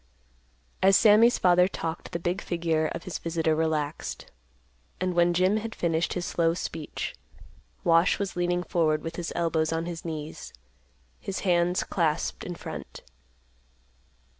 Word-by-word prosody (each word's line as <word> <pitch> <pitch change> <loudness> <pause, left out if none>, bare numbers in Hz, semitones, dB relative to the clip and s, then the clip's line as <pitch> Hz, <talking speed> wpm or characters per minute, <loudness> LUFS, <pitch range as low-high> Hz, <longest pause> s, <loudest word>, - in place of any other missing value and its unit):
As 195 0 +6
Sammy's 225 +2 +6
father 180 0 +5
talked, 165 -3 -5
the 170 - -2
big 175 +3 -2
figure 165 -2 0
of 165 - -6
his 185 - -5
visitor 165 -1 0
relaxed, 155 -2 -2 0.7
and 185 0 0
when 175 0 +4
Jim 185 +4 +3
had 225 +1 -5
finished 165 -1 0
his 175 -1 -3
slow 165 -1 +1
speech, 160 -3 -5 0.7
Wash 165 +1 +4
was 200 -2 -3
leaning 175 0 0
forward 155 -4 +1
with 165 0 -6
his 175 -1 -4
elbows 165 -2 +1
on 165 0 -1
his 170 -1 -6
knees, 155 -2 -6 0.7
his 195 - -4
hands 175 -1 +2
clasped 165 -3 -1
in 175 - -5
front. - - -8
170 Hz, 140 wpm, -27 LUFS, 165-180 Hz, 0.7 s, As